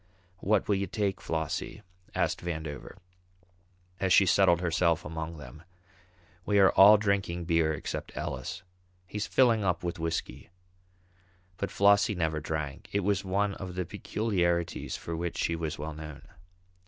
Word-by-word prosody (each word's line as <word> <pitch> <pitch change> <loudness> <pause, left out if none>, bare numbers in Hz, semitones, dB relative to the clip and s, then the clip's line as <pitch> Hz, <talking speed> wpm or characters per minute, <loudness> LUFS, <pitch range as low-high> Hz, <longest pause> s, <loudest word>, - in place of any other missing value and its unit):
"What 100 +1 +1
will 105 - +3
you 100 0 -2
take, 100 0 -2
Flossie?" 80 -2 -3 0.3
asked - - 0
Vandover, 80 -5 -5 1.0
as 95 -1 0
she 100 - +7
settled 90 -2 +4
herself 85 -1 +1
among 80 +1 -5
them. 75 0 -11 0.8
"We 100 +3 +1
are 95 -1 +6
all 105 +2 +8
drinking 100 -4 -1
beer 80 -2 +2
except 75 - -5
Ellis. - - -5 0.4
He's 105 +3 -4
filling 115 -5 +3
up 90 -2 0
with 85 -1 -3
whisky." 80 0 -4 1.1
But 100 - -2
Flossie 100 +2 +4
never 80 -3 -1
drank. 75 -2 -5
It 100 - +1
was 100 0 0
one 100 +1 0
of 95 -2 -7
the 90 -1 -2
peculiarities 85 -5 -1
for 85 - -5
which 85 +1 -3
she 85 - 0
was 80 -2 -4
well 75 +2 -5
known. 75 -2 -9
85 Hz, 145 wpm, -29 LUFS, 80-100 Hz, 1.1 s, all